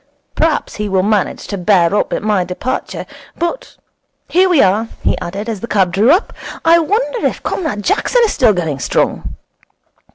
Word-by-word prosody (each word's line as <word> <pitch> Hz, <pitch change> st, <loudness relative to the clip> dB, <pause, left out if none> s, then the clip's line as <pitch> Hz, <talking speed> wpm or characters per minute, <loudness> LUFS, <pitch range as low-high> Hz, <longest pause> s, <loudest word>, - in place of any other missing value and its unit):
Perhaps 320 Hz, 0 st, 0 dB
he 210 Hz, -1 st, -3 dB
will 190 Hz, -1 st, +1 dB
manage 205 Hz, -2 st, 0 dB
to 200 Hz, -, -5 dB
bear 180 Hz, -2 st, +3 dB
up 205 Hz, -, 0 dB
at -, -, -2 dB
my 210 Hz, -3 st, +1 dB
departure. 185 Hz, +9 st, -4 dB, 0.3 s
But 345 Hz, +9 st, -4 dB, 0.5 s
here 370 Hz, +1 st, +3 dB
we 345 Hz, -5 st, +3 dB
are,' 205 Hz, +4 st, +1 dB, 0.2 s
he -, -, +2 dB
added, 195 Hz, +5 st, -5 dB
as 225 Hz, -3 st, -3 dB
the 235 Hz, -, -6 dB
cab 190 Hz, -5 st, +1 dB
drew 205 Hz, +7 st, +3 dB
up. 360 Hz, +8 st, +3 dB, 0.3 s
'I 335 Hz, +1 st, +6 dB
wonder 440 Hz, +8 st, 0 dB
if -, -, -5 dB
Comrade 280 Hz, -, -3 dB
Jackson 485 Hz, -, +2 dB
is 425 Hz, -, -1 dB
still 240 Hz, -4 st, +4 dB
going 160 Hz, -7 st, -2 dB
strong.' -, -, -1 dB
210 Hz, 175 wpm, -16 LUFS, -, 0.5 s, I